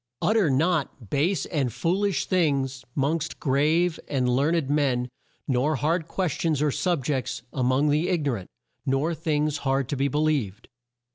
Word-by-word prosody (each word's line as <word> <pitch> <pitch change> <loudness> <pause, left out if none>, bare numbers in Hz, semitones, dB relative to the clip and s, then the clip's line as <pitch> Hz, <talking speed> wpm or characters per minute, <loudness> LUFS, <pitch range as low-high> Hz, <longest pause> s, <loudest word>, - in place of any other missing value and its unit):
"Ut 215 - +2
ter 200 -8 +3
not 140 - 0
base 160 +5 +1
and 140 -7 -1
fool 185 - 0
ish 195 -7 0
things 140 -7 0
'mongst 155 +3 -1
grave 155 +5 +2
and 130 -3 0
learn 140 +7 +2
ed 160 -5 0
men; 135 -4 +1 0.4
nor 140 +4 +1
hard 160 +4 0
ques 180 -1 -1
tions 155 0 0
or 150 0 +2
sub 170 -3 -1
jects 130 -4 -2
a 135 - -2
mong 130 +4 +2
the 155 +4 +1
ig 170 -5 0
no 140 - +2
rant; 100 -7 -5 0.3
nor 135 +5 0
things 155 -2 0
hard 135 -2 0
to - - -1
be 135 +1 +1
believed. 140 -8 -1
145 Hz, 180 wpm, -25 LUFS, 135-165 Hz, 0.4 s, ter